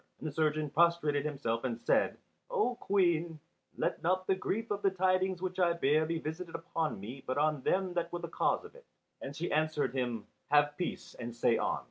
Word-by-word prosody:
And - - -5
the - - -3
surgeon 155 -1 +1
prostrated 155 -3 +3
himself 135 -6 -1
and 120 -3 -2
said, - - +2 0.3
"O 425 - +1
Queen, 175 -7 +1 0.4
let - - -1
not 185 +2 +1
the 190 - +3
grief 215 +4 -2
of 205 0 -1
the 200 - +4
tidings 185 0 +1
which 185 0 -3
I 175 -2 +4
bear 155 -1 +2
be 165 0 -1
visited 165 +2 -5
upon 165 - -2
me 125 +7 -8
but 130 - -2
on 150 -1 +2
them 185 +5 +1
that 170 -1 -1
were 175 - -2
the - - -5
cause - - 0
of - - -12
it." - - -17 0.3
And 140 - -6
she 170 +4 -3
answered 155 -4 +1
him, 120 -5 -2 0.2
"Have 145 0 +4
peace, 175 - -4
and 120 -1 -5
say 120 -1 +3
on!" - - 0
160 Hz, 205 wpm, -32 LUFS, 145-185 Hz, 0.4 s, the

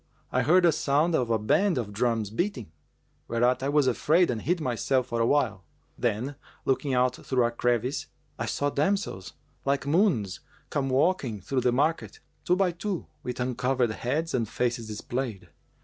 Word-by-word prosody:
I - - +2
heard 175 +3 +4
a 170 - +6
sound 150 +2 +1
of 125 -6 +1
a 115 - +3
band 175 - +2
of 105 -4 -3
drums 115 -2 0
beating; 125 - -2 0.6
whereat 120 +2 +2
I 135 - -1
was 145 -1 +3
afraid 155 +7 +3
and 115 -3 -3
hid 175 +1 0
myself 130 -1 0
for 115 0 -1
a 115 - +3
while: 115 -10 +1 0.3
then, 120 +5 -2 0.3
looking 135 0 +1
out 125 0 +2
through 130 -2 0
a 120 - 0
crevice, 120 +3 0 0.3
I - - -2
saw 145 0 0
damsels, 150 - -1 0.3
like 140 0 0
moons, 140 - +2 0.3
come 135 -2 0
walking 130 - +1
through 130 +8 -1
the 125 - +2
market, 150 +6 0 0.3
two 180 - +3
by 185 -1 +2
two, 180 +1 -4 0.2
with 125 - -5
uncovered 125 -1 0
heads 150 +9 -2
and 115 -4 0
faces 120 -2 -1
displayed. 110 0 -4
130 Hz, 170 wpm, -27 LUFS, 115-150 Hz, 0.6 s, a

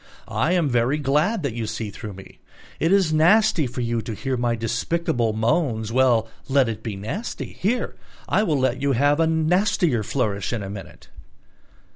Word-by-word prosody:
I 170 - 0
am 175 -4 +2
very 120 +2 +1
glad 155 +8 +1
that 140 -5 -1
you 115 -1 -3
see 110 -1 -4
through 105 -1 -8
me. 95 0 -13 0.4
It 165 +3 +1
is 190 -5 +3
nasty 170 -1 +4
for 125 +1 -5
you 115 -1 -1
to 110 0 -6
hear 130 +5 -2
my 120 -1 0
despicable 115 +2 -1
moans: 110 0 0
well, 120 -3 +3 0.2
let 135 -2 +4
it 115 -2 -4
be 110 -4 -5
nasty; 115 - -5
here 235 +6 -1 0.3
I - - +2
will 160 -9 +1
let 130 0 0
you 140 -1 +2
have 145 +4 +2
a 165 - +3
nastier 160 - +2
flourish 105 -2 -2
in 110 -4 -3
a 95 - -6
minute...." 100 -1 -10
130 Hz, 180 wpm, -23 LUFS, 115-160 Hz, 0.4 s, nasty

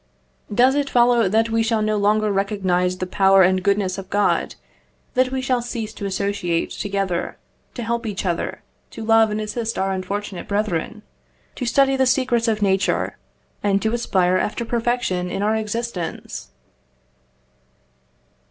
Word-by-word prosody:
Does 250 +5 +4
it 285 -1 0
follow, 240 -4 +4
that 225 +3 +2
we 225 0 +2
shall 225 -1 +1
no 215 0 +1
longer 210 +1 +2
recognise 190 -2 0
the 185 - -3
power 195 +1 +4
and 185 +1 +3
goodness 195 -1 0
of 190 -1 -9
God; 205 0 +1 0.6
that 255 0 +2
we 265 0 -1
shall 255 -2 0
cease 230 -2 -5
to 200 - -5
associate 190 -3 -1
together, 195 -3 -2 0.4
to 240 - -4
help 235 0 -2
each 200 -2 -4
other, 175 -2 -2 0.3
to 220 - -8
love 225 0 +5
and 210 0 -2
assist 220 +2 -3
our 195 0 0
unfortunate 190 0 -4
brethren, 210 +1 -2 0.5
to 250 - -4
study 270 +2 +3
the 265 -1 +2
secrets 250 -2 +2
of 215 -2 +1
nature, 195 -1 0 0.4
and 200 -1 +2
to 220 +1 0
aspire 185 -6 +2
after 215 +5 -2
perfection 230 -6 -1
in 195 - -2
our 215 +1 +2
existence? 220 - -4
210 Hz, 150 wpm, -21 LUFS, 195-235 Hz, 0.6 s, love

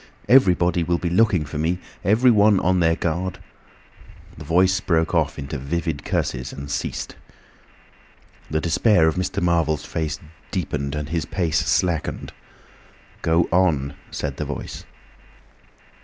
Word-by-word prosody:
Everybody 90 -8 +4
will 85 +1 +1
be 85 0 -3
looking 90 -5 +3
for 75 +1 -6
me; 85 +3 0 0.3
everyone 105 -1 +4
on 90 0 +2
their 80 -1 +3
guard—" 85 +3 -2 1.0
The 80 - -10
Voice 90 +4 +3
broke 80 -3 0
off 80 -3 +1
into 70 0 -5
vivid 80 +2 -3
curses 65 -1 -2
and 70 +1 -7
ceased. - - -4 1.3
The 80 - 0
despair 85 +2 +3
of 80 - +2
Mr. 90 +2 -2
Marvel's 80 -3 +1
face 80 -2 -3 0.3
deepened, 70 -7 -3
and 75 -1 -4
his 85 0 -1
pace 85 -5 0
slackened. 85 -4 -1 0.9
"Go 80 +1 +2
on!" 80 -6 +2 0.2
said - - -4
the - - -3
Voice. - - -6
85 Hz, 130 wpm, -22 LUFS, 75-90 Hz, 1.3 s, Everybody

